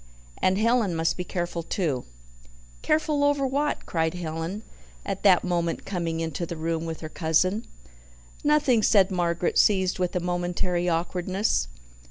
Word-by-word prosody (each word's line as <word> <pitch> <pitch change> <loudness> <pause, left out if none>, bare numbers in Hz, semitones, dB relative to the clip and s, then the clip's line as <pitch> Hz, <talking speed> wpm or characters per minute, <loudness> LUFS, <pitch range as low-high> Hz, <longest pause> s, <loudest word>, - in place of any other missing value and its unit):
"And 185 +1 +3
Helen 225 -4 +2
must 165 0 +1
be 180 - -3
careful, 175 -1 -3
too," 160 -7 -2 0.8
"Careful 305 -2 +1
over 285 -1 +2
what?" 285 +3 -1
cried 160 0 -1
Helen, 170 +4 -4 0.4
at 195 -1 -3
that 190 -3 +5
moment 170 -2 -1
coming 170 -4 -2
into 165 +1 -3
the 170 - -5
room 165 +1 -2
with 160 -1 -5
her 155 - -6
cousin. 185 +8 +1 0.8
"Nothing," 295 -6 +3
said 200 -2 +4
Margaret, 175 -1 0
seized 190 -3 +3
with 180 -1 -1
a - - +2
momentary 175 0 -1
awkwardness. 180 - 0
180 Hz, 145 wpm, -26 LUFS, 165-205 Hz, 0.8 s, that